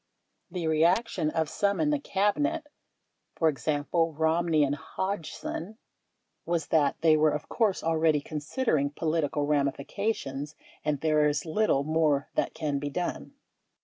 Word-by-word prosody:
The 175 -1 -4
reaction 160 +3 +2
of 160 0 0
some 200 +5 0
in 300 -1 +2
the 295 - +1
Cabinet 290 +9 0 0.7
(e.g., 145 -2 +1
Romney 165 -1 +2
and 140 0 +1
Hodgson) 190 +4 -4 0.7
was 170 -2 -1
that 145 -3 +2
they 160 -1 +5
were, 155 0 +4
of 150 0 -3
course, 215 -5 0
already 160 -2 +2
considering 150 - -1
political 155 -1 -1
ramifications 145 +1 -2 0.3
and 150 -2 -1
there 155 -1 +3
is 145 0 -1
little 160 -4 +1
more 155 -2 +1
that - - -1
can 145 -3 -1
be 145 +1 -3
done. 175 +4 -4
160 Hz, 130 wpm, -28 LUFS, 145-180 Hz, 0.7 s, they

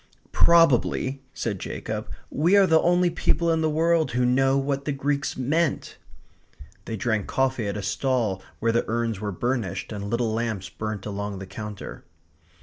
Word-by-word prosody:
"Probably," 140 -4 +3
said 105 -8 -3
Jacob, - - -5 0.2
"we 170 +7 +3
are 200 - +7
the 160 -3 +4
only 175 0 +3
people 170 0 +1
in 160 0 +1
the 160 - +2
world 160 -1 +2
who 125 +1 +2
know 135 +2 +3
what 140 0 -1
the 145 - 0
Greeks 140 +1 -1
meant." 150 +5 0 0.9
They 110 - -4
drank 110 -1 -1
coffee 130 -4 0
at 100 +1 -3
a 100 - -4
stall 110 -1 0 0.2
where 115 +1 +2
the 115 - +2
urns 115 -2 -1
were 105 -1 -2
burnished 105 -2 -2
and 100 -1 -5
little 115 -1 0
lamps 110 -4 -2
burnt 110 -2 -5
along 100 -1 -4
the 95 - -7
counter. 105 0 -8
125 Hz, 165 wpm, -25 LUFS, 105-145 Hz, 0.9 s, are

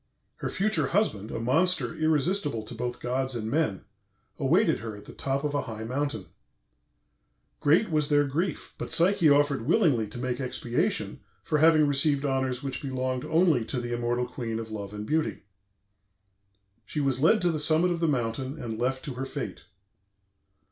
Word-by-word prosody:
Her - - -3
future 215 +3 0
husband, 110 - 0
a - - -4
monster 145 +2 +2
irresistible 155 - 0
to 110 - -8
both 120 +1 -4
gods 130 +1 -2
and 110 -1 -3
men, 145 - 0 0.5
awaited - - +3
her 110 -2 -6
at 105 - -12
the - - -11
top 135 +1 -2
of 150 -1 -1
a 145 - +1
high 110 -2 -6
mountain. 125 -4 -2 1.3
Great 165 +7 +3
was 150 -1 +1
their 145 -1 +4
grief, 160 +4 -3
but - - -4
Psyche 170 0 +4
offered 140 -4 +3
willingly 150 - +3
to 105 - -9
make 125 0 -2
expiation 125 -1 -2 0.2
for 150 - 0
having 155 -1 +6
received 145 0 +2
honors 130 -1 -1
which 135 -2 -4
belonged 130 -1 -2
only 160 -6 +3
to 125 - -3
the 120 0 -4
immortal 120 +1 0
queen 120 -2 -4
of 110 -1 -6
love 100 -2 -5
and 105 0 -6
beauty. 155 +5 -1 1.4
She 130 - -5
was 135 -2 0
led 190 +8 +5
to 175 - +3
the 155 - -2
summit 160 +4 +3
of 170 - -1
the 165 - +1
mountain 130 +1 -2
and 115 -2 -5
left 130 +2 -1
to 140 - -4
her 130 +2 -4
fate. 140 -1 -6
135 Hz, 175 wpm, -27 LUFS, 120-155 Hz, 1.4 s, having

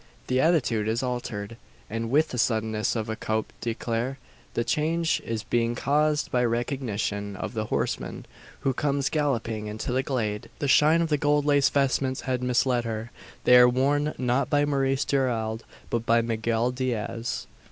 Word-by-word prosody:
The 130 0 +1
attitude 125 -10 +2
is 115 +3 0
altered, 115 -4 -4 0.3
and 115 +2 -3
with 155 +5 +3
the 125 - -4
suddenness 110 -1 0
of 110 -1 -2
a 110 - -2
coup 110 0 -1 0.2
d'eclair; 120 +2 -2 0.4
the 120 - +1
change 160 +7 0 0.3
being 120 0 +1
caused 150 +4 +1
by 125 -1 +2
recognition 115 -4 -2
of - - -5
the 110 -2 -2
horseman - - -2 0.4
who 135 - +1
comes 140 0 0
galloping 115 -8 -1
into 110 +3 -4
the 130 +1 +2
glade. 110 -6 -2
The 145 - -2
shine 155 +5 +5
of 165 - -2
the 150 -2 +1
gold 145 0 +2
laced 140 -3 +3
vestments 135 -1 +1
had 130 -1 -2
misled 125 0 +2
her. 115 0 -4 0.3
They 125 - +6
are 125 0 +8
worn 145 +4 +1
not 125 +2 0
by 145 -1 +3
Maurice 135 -1 +1
Gerald, 115 -5 -1 0.3
but 115 -1 0
by 115 0 +4
Miguel 115 +1 0
Diaz! 120 -2 -3
125 Hz, 165 wpm, -26 LUFS, 115-140 Hz, 0.4 s, are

